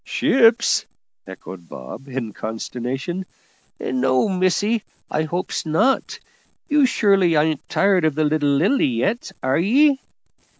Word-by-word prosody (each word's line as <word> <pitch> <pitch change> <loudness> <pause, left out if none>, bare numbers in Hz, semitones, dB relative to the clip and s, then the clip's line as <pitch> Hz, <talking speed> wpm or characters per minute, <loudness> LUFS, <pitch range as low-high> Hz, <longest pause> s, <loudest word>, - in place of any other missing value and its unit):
"Ships!" 235 -3 +3 0.4
echoed 95 -2 -11
Bob, 65 - -10
in 125 -5 -5
consternation; 125 +10 -5 0.6
"no, 130 +4 +1
missie, 200 +4 +1 0.3
I 155 +1 0
hopes 175 +4 -3
not. 165 +12 0 0.5
You 290 -2 +3
surely 195 -8 +2
ain't 155 0 0
tired 195 -3 +2
of 155 -3 +1
the 155 - +1
little 150 -1 +1
Lily 175 - +2
yet, 130 - -2
are 130 +3 +1
ye?" 270 - +3
160 Hz, 120 wpm, -21 LUFS, 130-205 Hz, 0.6 s, Ships